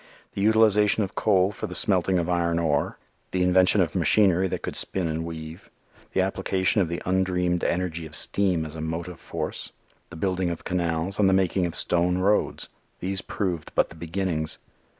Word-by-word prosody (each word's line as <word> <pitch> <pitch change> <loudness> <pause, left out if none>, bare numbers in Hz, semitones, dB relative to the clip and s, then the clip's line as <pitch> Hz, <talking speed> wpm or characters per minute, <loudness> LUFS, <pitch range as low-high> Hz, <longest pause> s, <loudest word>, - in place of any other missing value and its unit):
The 100 - -3
utilization 105 0 +4
of 95 - -5
coal 95 -2 +2
for 105 - -5
the - - -7
smelting 95 -1 +2
of 85 -1 0
iron 85 -1 +1
ore; 80 -4 0 0.3
the 90 -1 0
invention 95 +2 +4
of 85 -4 0
machinery 95 +1 +3
that - - -4
could - - -4
spin 95 -3 -1
and 80 0 -2
weave; 80 0 -8 0.4
the 95 - +2
application 95 +1 +1
of 85 - 0
the 85 - -4
undreamed 90 -1 +1
energy 85 -2 -1
of 75 - -10
steam 90 -5 +1
as 75 - -8
a 80 - -6
motive 80 +2 -4
force, - - -5 0.4
the 80 - -10
building 90 +1 -1
of 85 - -5
canals 85 +1 -1
and 100 -2 +5
the - - +3
making 95 -1 +2
of 85 - -5
stone 90 +1 +1
roads 100 +3 +1 0.3
these 95 +1 -2
proved 90 -6 -3
but - - +3
the - - -13
beginnings. 85 -1 -2
90 Hz, 185 wpm, -25 LUFS, 85-95 Hz, 0.4 s, and